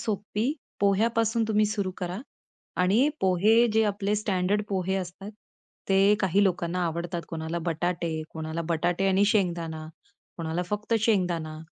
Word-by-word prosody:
सोपी 215 Hz, +4 st, -1 dB, 0.3 s
पोह्यापासून 225 Hz, +3 st, +2 dB
तुम्ही 215 Hz, -1 st, +3 dB
सुरु 205 Hz, -3 st, -2 dB
करा 180 Hz, +1 st, -4 dB, 0.6 s
आणि 220 Hz, +10 st, +4 dB
पोहे 205 Hz, +6 st, +4 dB
जे 220 Hz, +1 st, +4 dB
आपले 205 Hz, 0 st, 0 dB
स्टँडर्ड 200 Hz, 0 st, 0 dB
पोहे 190 Hz, -1 st, -1 dB
असतात. 190 Hz, +2 st, -6 dB, 0.6 s
ते 195 Hz, +1 st, +5 dB
काही 195 Hz, +1 st, +3 dB
लोकांना 180 Hz, -1 st, 0 dB
आवडतात 170 Hz, +1 st, -3 dB
कोणाला 160 Hz, +1 st, -3 dB
बटाटे, 165 Hz, -1 st, -1 dB
कोणाला 160 Hz, +1 st, -4 dB
बटाटे 175 Hz, +3 st, +1 dB
आणि 195 Hz, +1 st, +4 dB
शेंगदाणा, 170 Hz, -5 st, -1 dB, 0.5 s
कोणाला 165 Hz, +1 st, -2 dB
फक्त 210 Hz, +2 st, -1 dB
शेंगदाणा 175 Hz, -8 st, 0 dB
190 Hz, 130 wpm, -27 LUFS, 170-210 Hz, 0.6 s, ते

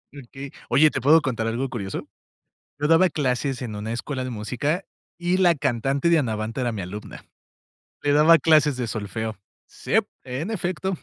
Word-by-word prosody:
Okey. 135 Hz, +1 st, -9 dB, 0.2 s
Oye, 155 Hz, +2 st, +5 dB
¿te 130 Hz, -, -3 dB
puedo 155 Hz, +5 st, +6 dB
contar 115 Hz, -5 st, -2 dB
algo 125 Hz, +4 st, -2 dB
curioso? 100 Hz, -6 st, -5 dB, 0.7 s
Yo 150 Hz, -, +1 dB
daba 165 Hz, +3 st, +5 dB
clases 135 Hz, -2 st, -1 dB
en 110 Hz, -4 st, -5 dB
una 110 Hz, +2 st, -4 dB
escuela 130 Hz, +2 st, -4 dB
de 130 Hz, -, -4 dB
música 125 Hz, -, -2 dB, 0.3 s
y 175 Hz, +1 st, +1 dB
la 175 Hz, -3 st, +4 dB
cantante 135 Hz, +2 st, 0 dB
de 170 Hz, -1 st, +5 dB
Anabantha 115 Hz, -1 st, -2 dB
era 120 Hz, -, 0 dB
mi 105 Hz, -, -4 dB
alumna. 100 Hz, +4 st, -8 dB, 0.8 s
Le 145 Hz, -, +2 dB
daba 155 Hz, +3 st, +6 dB
clases 150 Hz, -2 st, +4 dB
de 125 Hz, -2 st, -2 dB
solfeo. 110 Hz, 0 st, -4 dB, 0.3 s
Sip, -, -, 0 dB, 0.2 s
en 135 Hz, -, -4 dB
efecto. 185 Hz, -2 st, -2 dB
135 Hz, 170 wpm, -24 LUFS, 115-155 Hz, 0.8 s, puedo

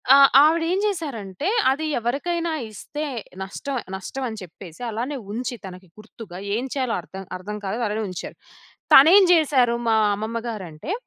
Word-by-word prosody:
ఆహ్, 275 Hz, 0 st, +8 dB
ఆవిడేం 330 Hz, +4 st, +2 dB
జేశారంటే 285 Hz, -, -3 dB, 0.2 s
అది 310 Hz, +4 st, -2 dB
ఎవరికైనా 330 Hz, +8 st, -1 dB, 0.2 s
ఇస్తే 295 Hz, +8 st, -6 dB, 0.4 s
నష్టం, 265 Hz, +8 st, -5 dB, 0.2 s
నష్టం 265 Hz, +7 st, -6 dB
అని 220 Hz, -, -7 dB
చెప్పేసి 175 Hz, +1 st, -12 dB
అలానే 245 Hz, +6 st, -3 dB, 0.2 s
ఉంచి 245 Hz, +2 st, -3 dB
తనకి 185 Hz, 0 st, -10 dB
గుర్తుగా 215 Hz, -4 st, -11 dB, 0.2 s
ఏం 245 Hz, +4 st, -2 dB
చేయాలో 255 Hz, -4 st, -1 dB
అర్థం, 190 Hz, +3 st, -9 dB
అర్థం 205 Hz, +3 st, -7 dB
కాలేదు 225 Hz, +5 st, -2 dB
అలానే 215 Hz, +1 st, -2 dB
ఉంచారు. 180 Hz, -, -7 dB, 0.6 s
తనేం 350 Hz, +8 st, +9 dB
జేశారు 270 Hz, -8 st, +4 dB
మా 225 Hz, -, +4 dB, 0.2 s
అమ్మమ్మ 220 Hz, +3 st, -4 dB
గారంటే 190 Hz, -, -6 dB
235 Hz, 140 wpm, -23 LUFS, 200-295 Hz, 0.6 s, తనేం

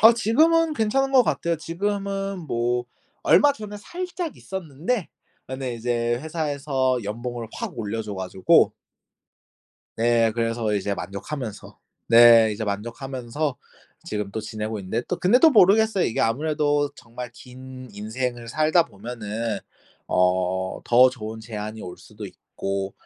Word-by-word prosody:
아. 225 Hz, +2 st, +9 dB
지금은 315 Hz, +8 st, +3 dB
괜찮은 270 Hz, +4 st, +1 dB
것 255 Hz, -2 st, +7 dB
같아요. 170 Hz, -6 st, 0 dB
지금은 195 Hz, +3 st, -3 dB
뭐 120 Hz, 0 st, 0 dB, 0.4 s
얼마 290 Hz, -1 st, +5 dB
전에 210 Hz, -4 st, -8 dB
살짝 350 Hz, -, -5 dB
있었는데 185 Hz, -, -3 dB, 0.4 s
그런데 130 Hz, -2 st, -4 dB
이제 120 Hz, 0 st, -1 dB
회사에서 140 Hz, -5 st, -1 dB
연봉을 115 Hz, +3 st, -5 dB
확 -, -, -6 dB
올려 110 Hz, +1 st, -3 dB
줘 105 Hz, -2 st, -6 dB
가지고 95 Hz, 0 st, +3 dB, 1.3 s
네. 115 Hz, -1 st, +3 dB
그래서 115 Hz, -2 st, 0 dB
이제 100 Hz, 0 st, -1 dB
만족하면서. 110 Hz, +5 st, -6 dB, 0.3 s
네 115 Hz, -1 st, +8 dB
이제 110 Hz, +1 st, -4 dB
만족하면서 125 Hz, +6 st, -3 dB, 0.5 s
지금 105 Hz, -2 st, -4 dB
또 110 Hz, -, -3 dB
지내고 110 Hz, 0 st, -4 dB
있는데 110 Hz, +5 st, -2 dB
또 180 Hz, -, -2 dB
근데 200 Hz, +7 st, +4 dB
또 325 Hz, -, +7 dB
모르겠어요. 215 Hz, -3 st, +5 dB
이게 115 Hz, -, -1 dB
아무래도 145 Hz, +3 st, +1 dB
정말 120 Hz, 0 st, -9 dB
긴 130 Hz, +1 st, -11 dB
인생을 120 Hz, +3 st, -4 dB
살다 155 Hz, +6 st, +3 dB
보면은 110 Hz, +1 st, -5 dB, 0.5 s
어 90 Hz, +1 st, +1 dB
더 125 Hz, +2 st, +6 dB
좋은 110 Hz, -3 st, -7 dB
제안이 110 Hz, -1 st, -6 dB
올 90 Hz, -, -8 dB
수도 -, -, -10 dB
있고 95 Hz, 0 st, -5 dB
125 Hz, 285 characters per minute, -24 LUFS, 110-170 Hz, 1.3 s, 아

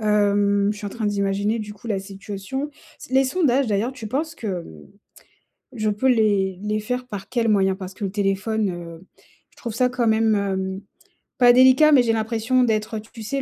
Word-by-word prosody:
Hem, 205 Hz, -1 st, +2 dB
je -, -, -10 dB
suis 210 Hz, 0 st, -6 dB
en -, -, -2 dB
train 220 Hz, -1 st, -3 dB
d'imaginer 200 Hz, +2 st, 0 dB
du 210 Hz, -1 st, -6 dB
coup 205 Hz, +3 st, -14 dB
la 210 Hz, -4 st, -1 dB
situation. 200 Hz, +8 st, -6 dB, 0.4 s
Les 265 Hz, +1 st, +4 dB
sondages 275 Hz, -2 st, +1 dB
d'ailleurs, 215 Hz, +4 st, 0 dB
tu 255 Hz, -4 st, -8 dB
penses 310 Hz, +8 st, -3 dB
que, 230 Hz, -, -8 dB
mmh, 80 Hz, -, -6 dB, 0.9 s
je 215 Hz, -2 st, 0 dB
peux 210 Hz, +6 st, 0 dB
les 205 Hz, -6 st, +2 dB
les 210 Hz, +1 st, -1 dB
faire 250 Hz, +3 st, -3 dB
par 200 Hz, -5 st, -7 dB
quel 235 Hz, -3 st, 0 dB
moyen? 195 Hz, -3 st, +3 dB
Parce 190 Hz, -1 st, -8 dB
que 200 Hz, -, -6 dB
le 195 Hz, -, -2 dB
téléphone, 205 Hz, +1 st, 0 dB
heu, 170 Hz, -1 st, -9 dB, 0.5 s
je -, -, -30 dB
trouve 235 Hz, -3 st, -6 dB
ça 250 Hz, +2 st, +2 dB
quand 245 Hz, -2 st, -1 dB
même, 220 Hz, 0 st, +3 dB
hem, 190 Hz, -1 st, -2 dB, 0.6 s
pas 245 Hz, -1 st, +7 dB
délicat, 260 Hz, +5 st, +6 dB
mais 270 Hz, -4 st, +6 dB
j'ai 230 Hz, -1 st, +1 dB
l'impression 225 Hz, +3 st, +1 dB
d'être, 220 Hz, -1 st, 0 dB
heu, -, -, -5 dB
tu 225 Hz, +1 st, -12 dB
sais, 275 Hz, +6 st, -2 dB
215 Hz, 200 wpm, -22 LUFS, 200-245 Hz, 0.9 s, pas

